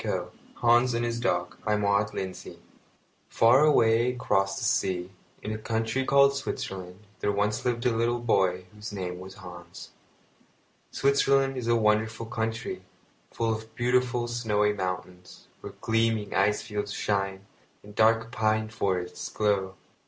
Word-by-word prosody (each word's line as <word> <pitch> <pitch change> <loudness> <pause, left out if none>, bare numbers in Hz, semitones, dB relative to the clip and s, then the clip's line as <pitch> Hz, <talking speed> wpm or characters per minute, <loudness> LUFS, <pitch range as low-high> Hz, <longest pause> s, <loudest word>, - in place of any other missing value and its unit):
Hans 120 +1 +3
and 120 0 0
his 120 0 -2
Dog 120 - -1
MAUD 105 0 +1
LINDSAY 95 -1 -5
The - - -12
Golden - - -25
Coin - - -34
Far 125 +5 +5
away 120 -4 +4
across 95 -5 0
the - - -4
sea, 90 -1 0 0.3
in 105 - -4
a 110 - -4
country 115 +3 -1
called 140 0 +5
Switzerland, 95 -7 -5
there 105 - 0
once 105 +1 0
lived 120 0 -1
a 120 -2 +2
little 120 +1 +1
boy 95 -6 +1
whose 105 +1 -8
name 90 -3 -5
was 95 +1 -10
Hans. 90 -2 -11 1.0
Switzerland 135 -1 +2
is 125 -3 -4
a 120 - +4
wonderful 110 0 +1
country, 110 0 -3 0.5
full 115 -1 -1
of 110 0 -8
beautiful 125 0 +1
snowy 105 -3 +1
mountains, 90 -4 -6
where - - -9
gleaming 115 -2 0
ice 105 +2 +2
fields 105 -1 -4
shine, 100 -2 -2 0.4
and 105 - -13
dark 115 +1 +3
pine 110 -1 0
forests 95 -5 -2
grow. 100 -3 0
110 Hz, 145 wpm, -27 LUFS, 100-120 Hz, 1.0 s, Far